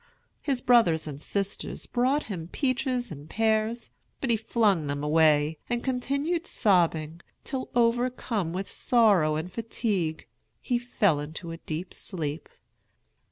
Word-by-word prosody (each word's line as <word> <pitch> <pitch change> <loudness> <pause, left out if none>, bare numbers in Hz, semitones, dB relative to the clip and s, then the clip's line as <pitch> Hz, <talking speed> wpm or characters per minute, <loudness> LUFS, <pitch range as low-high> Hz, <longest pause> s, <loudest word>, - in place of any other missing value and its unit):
His 270 -4 -1
brother 230 -11 +5
and 145 -2 -7
sisters 200 +3 -3
brought 260 +4 +1
him 175 -6 -6
peaches 255 - -1
and 150 0 -9
pears, 220 +2 0 0.3
but 265 - 0
he - - +5
flung 210 -7 +1
them 145 0 -2
away, 155 0 +3
and 240 -1 -1
continued 280 +7 -1
sobbing, 170 -5 +1 0.2
till, 265 -3 -4
overcome 235 -5 +1
with 190 +3 -3
sorrow 200 -11 +3
and 160 +4 -4
fatigue, 205 -8 -2 0.3
he 245 -1 0
fell 205 -10 +1
into 160 +3 -6
a 165 - -6
deep 165 +2 -5
sleep. 160 -5 -5
205 Hz, 130 wpm, -27 LUFS, 160-245 Hz, 0.3 s, brother